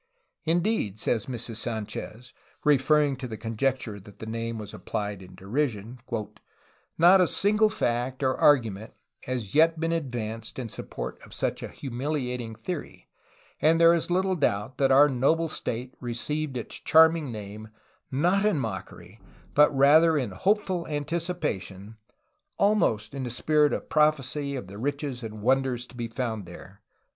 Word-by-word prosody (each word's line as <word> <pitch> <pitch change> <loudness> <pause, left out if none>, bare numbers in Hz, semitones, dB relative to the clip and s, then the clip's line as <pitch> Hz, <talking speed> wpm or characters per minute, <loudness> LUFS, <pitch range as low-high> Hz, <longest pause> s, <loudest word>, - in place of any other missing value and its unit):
Indeed, 170 - 0
says 110 0 -1
Mrs. 120 -3 -5
Sanchez, 110 +1 -5 0.3
referring 145 0 +3
to 130 -1 -5
the 110 -2 -6
conjecture 115 -1 -2
that 100 +1 -15
the - - -8
name 115 +1 -4
was 105 -2 -7
appUed 105 -3 -4
in 90 0 -13
derision, 115 +1 -3 1.0
"not 180 +3 +7
a 180 - +4
single 210 +4 +3
fact 125 - -1
or 130 0 +2
argument 110 -7 +2 0.3
has 120 -6 -4
yet 160 +1 +4
been 165 0 0
advanced 115 -8 -4
in 125 -3 -4
support - - -7
of - - -12
such - - -2
a - - -4
humiliating 125 -3 -4
theory, 155 +9 -7 0.5
and 160 +1 +4
there 165 0 +7
is 170 0 0
little 185 +1 +1
doubt 120 - -1
that 135 -1 +3
our 140 +2 +7
noble 150 +5 +1
State 125 -3 -4
received 130 +4 -3
its 120 - -6
charming 160 -3 +4
name, 105 0 -8 0.4
not 175 +9 +2
in 210 -5 +2
mockery, 110 -3 -6 0.3
but 150 +1 +6
rather 155 +4 +6
in 125 -8 -1
hopeful 185 - 0
anticipation, 145 - -3 0.6
almost 200 - +2
in 135 -2 -4
a - - -3
spirit 150 +5 +2
of - - -3
prophecy 145 -2 +1
of 130 - -5
the 100 +2 -10
riches 140 0 -3
and 110 -2 -7
wonders 130 -1 +1
to 125 - -17
be 120 -1 -3
found 115 -4 -4
there." 95 +4 -12
130 Hz, 150 wpm, -27 LUFS, 110-155 Hz, 1.0 s, not